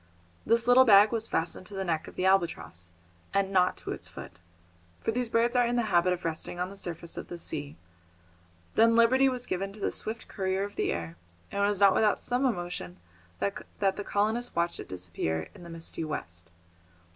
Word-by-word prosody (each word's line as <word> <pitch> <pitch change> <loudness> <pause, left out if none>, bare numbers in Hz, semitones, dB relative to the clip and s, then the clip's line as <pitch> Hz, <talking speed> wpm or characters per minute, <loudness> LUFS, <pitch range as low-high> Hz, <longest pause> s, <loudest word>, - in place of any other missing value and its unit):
This 230 0 +3
little 250 +1 +8
bag 210 -3 +7
was 225 -1 0
fastened 165 +3 -2
to 205 - -9
the 195 - -2
neck 165 -3 -1
of - - -11
the 185 - -1
albatross, 170 - 0 0.5
and 195 -1 +2
not 180 -1 +3
to - - -6
its - - -5
foot, 85 - -11 0.6
for - - -1
these 245 0 -2
birds 235 +2 +2
are 245 -1 +4
in 240 - 0
the 240 - +2
habit 175 +1 +4
of 180 0 -3
resting 165 +2 -2
on 180 +1 -2
the - - -10
surface 170 -3 -5
of - - -6
the 175 - -7
sea; 145 -4 -5 1.0
then 230 +1 +5
liberty 260 +4 +5
was 250 -1 -4
given 195 +2 -3
to 215 - -12
this - - -1
swift 220 +1 -5
courier 190 -1 -1
of 205 0 -6
the - - 0
air, 85 0 -4 0.3
and 200 - 0
it - - +4
was 205 -2 0
not 200 -1 +6
without 210 0 +3
some 250 +2 0
emotion 175 - -4 0.4
that 200 - -2
the 200 0 0
colonists 220 +5 0
watched 170 0 0
it - - -8
disappear 85 -3 -3
in - - -14
the 170 - -10
misty 165 0 -3
west. 85 - -6
195 Hz, 205 wpm, -29 LUFS, 170-225 Hz, 1.0 s, little